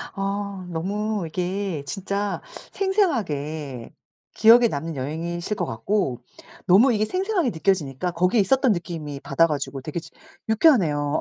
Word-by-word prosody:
어 195 -1 -3
너무 200 +4 -2
이게 180 -1 -3
진짜 200 +4 -3 0.3
생생하게 160 - -1 0.4
기억에 235 +2 +7
남는 160 -1 -4
여행이실 170 +8 -3
것 180 -4 -2
같고 130 - -1 0.5
너무 225 +8 +6
이게 215 0 +1
생생하게 370 - 0
느껴지니까 165 -2 0
거기에 180 +6 +2
있었던 260 +4 +3
느낌이 165 -6 -4
받아 165 +4 +3
가지고 140 -3 -3
되게 155 +4 -4
지금 165 0 -16 0.3
유쾌하네요. 170 - +3
180 Hz, 315 characters per minute, -24 LUFS, 155-215 Hz, 0.5 s, 기억에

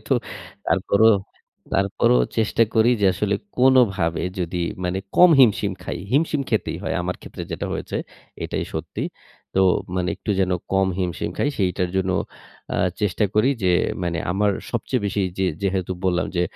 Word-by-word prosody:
তো - - +2 0.5
তারপরও 100 +3 +3 0.6
তারপরও 95 -10 +3 0.2
চেষ্টা 110 +1 +2
করি 110 +2 +5
যে, 100 - +2
আসলে 100 +2 0 0.2
কোনোভাবে 120 -11 +3 0.2
যদি 90 0 -2 0.3
মানে 90 +1 -1 0.2
কম 180 -1 +8
হিমশিম 105 -5 +4
খাই। - - -4
হিমশিম 150 0 +2
খেতেই 110 -6 0
হয়। 95 - -2
আমার 90 +1 -2
ক্ষেত্রে - - -8
যেটা - - -3
হয়েছে - - -4 0.5
এটাই - - -2
সত্যি। - - -4 0.5
তো 95 - +3 0.4
মানে 90 -1 0
একটু 105 - -5
যেন 95 -1 +1 0.2
কম 95 0 +3
হিমশিম 90 -2 -2
খাই, 145 - +2
সেইটার 90 -2 0
জন্য 95 0 +1 0.6
আ - - 0 0.2
চেষ্টা 105 0 +1
করি 110 +5 +4
যে 90 - +3 0.3
মানে, 85 -1 -1
আমার 100 +2 +2 0.2
সবচেয়ে 120 0 -1
বেশি 100 - -1 0.2
যে 95 - +2 0.2
যেহেতু 95 -1 -1
বললাম 90 -1 +1
যে, 90 - +3
95 Hz, 155 wpm, -22 LUFS, 90-110 Hz, 0.6 s, কম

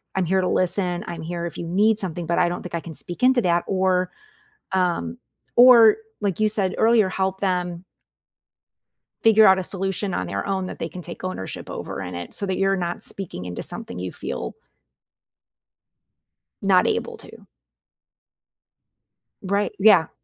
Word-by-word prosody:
I'm 190 -1 +1
here 190 +2 +2
to 180 - 0
listen, 180 -1 0
I'm 170 -2 -6
here 170 +1 -4
if 170 - -6
you 170 - -5
need 210 +5 +3
something, 175 -3 -4
but 170 - 0
I 175 - +4
don't 175 - -4
think 175 -1 -6
I - - -1
can 165 - -9
speak 175 +7 -7
into 255 -1 +5
that," 170 -1 +2
or, 185 -1 +1 0.6
um 175 - 0 0.4
or, 240 -3 +8 0.2
like 200 -3 -1
you 215 0 +3
said 200 -3 -1
earlier, 220 -4 +4
help 190 0 -2
them 180 -2 -1 1.4
figure 220 -1 +6
out 190 0 +5
a - - -1
solution 195 +1 -2
on 90 -2 -2
their 100 +1 -3
own 190 -1 -1
that - - -7
they 165 - -3
can 180 +2 -9
take 175 +2 -9
ownership 185 - -5
over - - -6
in 90 - -6
it, 85 0 -7
so 200 - -3
that 190 -1 -1
you're 195 0 +2
not 175 -1 -3
speaking 125 - -6
into 90 - -5
something 90 - -7
you 90 0 -4
feel 60 - -5 2.1
not - - +4
able - - -1
to. - - -11 2.0
Right, 200 +2 0
yeah. 195 -5 +6
185 Hz, 170 wpm, -23 LUFS, 170-195 Hz, 2.1 s, or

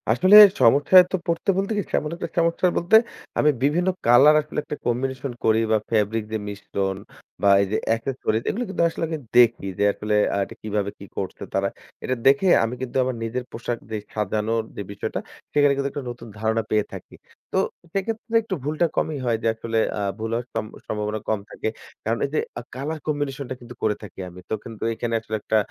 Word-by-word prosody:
আসলে 185 - +5 0.3
সমস্যায় 145 +10 +7
তো - - +1
পড়তে 170 +4 -1
বলতে 195 +2 -1
কি? - - +2
তেমন 150 - 0
একটা 170 - -5
সমস্যায় 170 +2 +2
বলতে, 175 +6 +3 0.4
আমি 150 - +5
বিভিন্ন 170 +6 +2 0.2
কালার 130 +6 +7
আসলে 150 0 -4
একটা - - -5
কম্বিনেশন 130 +2 -1
করি 110 0 +4
বা 110 - +5
ফেব্রিক 110 0 +1
দিয়ে 110 -1 -3
মিশ্রণ 100 -1 -3 0.4
বা 100 - +4
এই 100 - 0
যে 110 - +2 0.2
এক্সেসরিজ, 115 -2 -2
এগুলি 240 - -1
কিন্তু 195 - 0
আসলে 165 - -5
আগে 160 -1 -3 0.2
দেখি, 115 -4 +5
যে - - +3
আসলে 105 0 -2 0.2
আ - - 0
এটা - - -12
কিভাবে 105 -2 -1
কি 100 - -9
করছে 95 - -4
তারা? - - +1 0.4
এটা 130 - 0
দেখে 140 +8 +5 0.2
আমি 115 +2 -2
কিন্তু 130 0 -3
আমার 130 -1 -2
নিজের 120 +3 -3
পোশাক, 120 +1 -3
ড্রেস 110 -2 -4
সাজানোর 110 +2 -1
যেই 100 - -5
বিষয়টা, 100 - -4 0.3
সেইখানে 145 -1 +4
কিন্তু 140 0 -1
একটা 145 - -5
নতুন 120 -1 -8
ধারণা 110 +1 +1
পেয়ে 105 -1 +2
থাকি। - - -10 0.4
তো - - 0 0.4
সেক্ষেত্রে 225 +3 -3
একটু 210 -3 -3
ভুলটা 155 +4 +1
কমই 155 - 0
হয় 115 -2 +1
যে, - - +2
আসলে 115 0 -3 0.2
আ - - -1 0.2
ভুল 110 +1 -3
হওয়ার 120 +1 -1
সম 110 -1 -2 0.2
সম্ভাবনা 105 0 -2
কম 110 -2 +1
থাকে। - - -3 0.4
কারণ 115 +2 +1
এই - - -4
যে - - +3 0.2
আ - - -6
কালার 150 +4 -4
কম্বিনেশন 145 -2 -2
টা - - -2
কিন্তু 120 0 -11
করে 105 -1 +2
থাকি 105 - -11
আমি। 90 +1 -12
তো - - -1
কিন্তু 115 -3 -8
এখানে 115 +1 -3
আসলে 110 -1 -5
একটা 110 - +1
120 Hz, 205 wpm, -23 LUFS, 110-150 Hz, 0.4 s, সমস্যায়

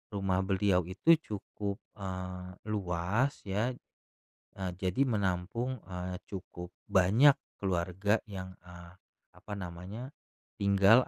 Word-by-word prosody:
rumah 95 -2 +1
beliau 95 -3 +3
itu 100 - +4
cukup, 100 -4 -4 0.2
eee, 90 -1 -5 0.2
luas, 100 +7 +1
ya. 110 +5 0 0.8
Eee, 95 -1 -1
jadi 95 +9 +1
menampung, 110 +4 0
eee, 90 0 -4
cukup 90 -2 -6 0.2
banyak 105 +10 +7 0.3
keluarga 95 +3 +2
yang, 95 -2 -6
eee, 90 -1 -12 0.4
apa 105 - -9
namanya, 95 +7 -6 0.5
tinggal 100 +5 +6
95 Hz, 105 wpm, -32 LUFS, 90-105 Hz, 0.8 s, banyak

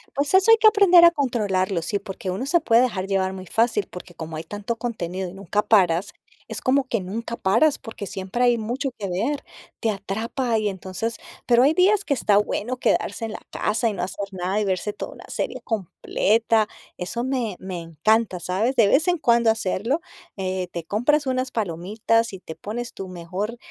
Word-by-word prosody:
Pues 285 +4 0
eso 390 +4 +6
hay 455 - +8
que 435 0 +6
aprender 390 -5 +7
a 340 - +8
controlarlo, 205 - 0
sí, 205 +5 -1
porque 195 -1 -6
uno 195 +9 -2
se 340 +4 +3
puede 235 -5 +4
dejar 195 -7 -1
llevar 190 -1 0
muy 185 -1 -8
fácil, 225 -1 +1
porque 180 0 -10
como 160 -1 -7
hay 155 - -5
tanto 205 +6 -4
contenido 190 -6 -4
y 175 - -9
nunca 200 +2 -1
paras, 185 -3 +3 0.4
es - - -6
como 270 +2 +3
que 230 -6 -1
nunca 230 +5 -5
paras, 230 +11 +2
porque 225 -3 -8
siempre 195 +5 -3
hay 240 -2 +4
mucho 250 +6 -2
que 200 - -3
ver, 250 +11 -1 0.4
te 225 - 0
atrapa, 220 +4 -2
y 210 - 0
entonces 190 +4 -4 0.3
pero 240 0 +5
hay 295 +3 +5
días 395 +4 +3
que 285 - +1
está 210 -5 +3
bueno 230 +4 -1
quedarse 230 - 0
en 225 - -5
la - - -6
casa 225 +2 0
y 210 - -3
no 180 - -3
hacer 195 +2 -4
nada 185 +3 -1
y 210 - 0
verse 195 +2 -1
toda - - -7
una - - -12
serie - - -3
completa, 220 +2 +1 0.3
eso 235 +7 -3
me 250 -7 -1
me 185 -2 -5
encanta, 185 +5 +1
¿sabes?, 200 +9 -1
de 225 -5 +5
vez 310 - +3
en 355 - +3
cuando 235 -5 +3
hacerlo, 225 - 0 0.4
eh, 185 -1 -2
te 170 - -5
compras 250 - +1
unas 255 0 -1
palomitas 215 +3 0
y 190 - -7
te 160 - -8
pones 230 +7 -6
tu 190 - -7
mejor 185 +6 -5
215 Hz, 200 wpm, -23 LUFS, 190-245 Hz, 0.4 s, hay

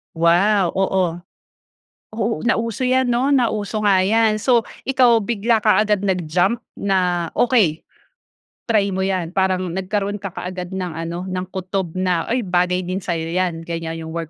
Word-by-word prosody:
Wow! 175 +3 +3
Oo. 185 -3 +1 1.0
Oo, 225 0 -1
nauso 230 -1 -1
'yan 260 0 +3
'no, 250 +3 +1
nauso 215 -5 0
nga 195 -2 +4
'yan. 215 +2 +2
So, 240 -2 +3 0.2
ikaw 245 -4 +4
bigla 225 +1 +1
ka 215 0 +4
agad 210 -2 +1
nag-jump 185 +2 +1 0.2
na," 180 -4 0
Okey, 210 -11 +2 0.9
try 205 -3 +2
mo 190 - -2
yan". 185 -3 -1
Parang 185 -2 0
nagkaroon 200 +2 -2
ka 195 - -4
kaagad 180 0 -6
ng 180 -2 -3
ano, 170 +2 -5
ng 185 -1 -3
kutob 190 -2 -4
na, 180 -3 0
"Uy, 240 -1 0
bagay 180 0 +1
din 185 +2 -3
sayo 170 -4 -2
'yan", 175 -2 -1
ganyan. 165 -1 -5
Yung 160 - -7
work 165 -2 -4
190 Hz, 155 wpm, -20 LUFS, 175-215 Hz, 1.0 s, nga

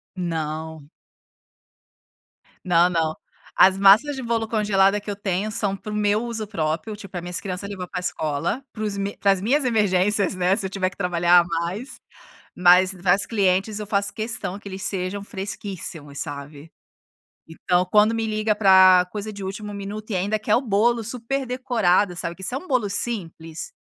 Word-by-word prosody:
Não. 160 -3 -4 1.8
Não, 175 0 +4
não. 160 -2 0 0.4
As 190 0 +6
massas 215 +9 +5
de 265 - -6
bolo 230 -1 -1
congelada 205 -2 +2
que 205 - -5
eu - - -4
tenho, 200 +1 -2
são 205 -3 -1
para 210 +2 -8
o - - -3
meu 210 +2 +1
uso 225 -3 -4
próprio, 165 +3 -3
tipo, 200 -3 -12
para 175 -2 -5
minhas 175 0 -4
criança 190 +1 -5
levar 185 -3 -6
para 180 - -4
escola, 160 - -2
para 215 - -6
os 210 -2 -2 0.3
para 200 - +4
as 190 -1 0
minhas 265 +6 +1
emergências, 205 -3 +2
né, 185 +1 +2
se 200 - -4
eu - - -2
tiver 185 -1 -1
que 180 - -18
trabalhar 175 -1 +4
a - - +3
mais, 175 +9 -4 0.6
mas 180 +1 +5
para 180 0 +2
as 200 - -2
clientes, 200 0 +1
eu 210 - -6
faço 200 0 -1
questão 220 -3 -3
que 200 - -10
eles 190 0 -7
sejam 190 +1 -3
fresquíssimos, 190 -8 -7
sabe? 145 +1 -7 0.8
Então, 180 +2 0
quando 215 +1 +4
me 225 -1 -1
liga 215 0 0
para 185 -3 +6
coisa 215 0 -5
de 200 -1 -8
último 205 +2 -6
minuto 210 +2 -7
e - - -1
ainda 200 +4 0
quer 215 0 +1
o 245 - +2
bolo 230 +1 +1
super 250 +4 -3
decorado, 225 -8 +1
sabe. 170 0 -4
Que 190 - -11
se 210 - -2
é - - 0
um 370 - -10
bolo 245 -7 +1
simples 175 -6 -5
195 Hz, 185 wpm, -23 LUFS, 180-215 Hz, 1.8 s, As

